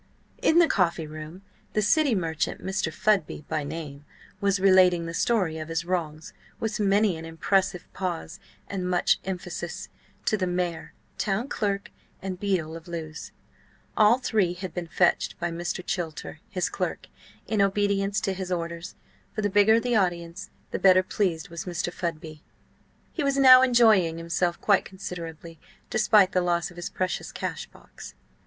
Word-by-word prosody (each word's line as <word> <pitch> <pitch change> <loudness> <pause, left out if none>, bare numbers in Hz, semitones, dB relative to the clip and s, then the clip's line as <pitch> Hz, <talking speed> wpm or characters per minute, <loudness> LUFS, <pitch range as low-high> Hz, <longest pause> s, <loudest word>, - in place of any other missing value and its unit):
In 340 -10 +4
the 340 -1 +7
coffee 170 - +1
room 155 +4 -9 0.3
the 215 - +2
city 260 +4 +3
merchant, 165 -4 -2
Mr. 190 -4 -1
Fudby 185 -4 0
by 155 -2 -2
name, 145 -1 -7 0.4
was 200 -1 +1
relating 185 -3 +5
the 165 - -5
story 180 -5 +1
of 155 - -6
his 165 +1 -2
wrongs, 160 -3 -3 0.3
with 220 -1 -2
many 200 -2 +3
an 160 - -8
impressive 180 +3 0
pause, 180 -1 -4 0.3
and 185 -2 -3
much 180 -1 +2
emphasis, 180 -2 -5 0.4
to 215 - +2
the 185 -2 -1
mayor, 175 -2 -3 0.3
town 210 +5 0
clerk, 200 -2 -2 0.3
and 185 -2 -5
beadle 180 -6 -1
of 165 +1 -10
Lewes. 160 -3 -6 0.6
All 215 +2 +5
three 210 -8 +1
had 185 -1 -6
been 175 -2 -4
fetched 175 +1 +1
by 175 0 -2
Mr. 175 +1 -4
Chilter, 165 -4 -4
his 180 -2 -1
clerk, - - -3 0.4
in 215 -2 0
obedience 200 0 +1
to 195 - -1
his 185 -1 -5
orders, 170 -1 -4 0.4
for 215 - -2
the 205 - 0
bigger 205 +3 +5
the 245 0 0
audience 175 -1 -1 0.2
the - - -2
better 185 -1 +6
pleased 185 -2 -1
was 170 0 -6
Mr. 175 -1 -3
Fudby. 155 -3 -5 0.7
He 335 - -2
was 275 -1 +1
now 255 -2 +9
enjoying 220 -10 +4
himself 170 +1 -1
quite 200 -2 +3
considerably, 170 -4 -8 0.3
despite 210 -3 +4
the 185 - +2
loss 175 -1 0
of 175 - -16
his 175 - -4
precious 185 -2 -3
cash - - -4
box. - - -13
180 Hz, 160 wpm, -26 LUFS, 165-200 Hz, 0.7 s, now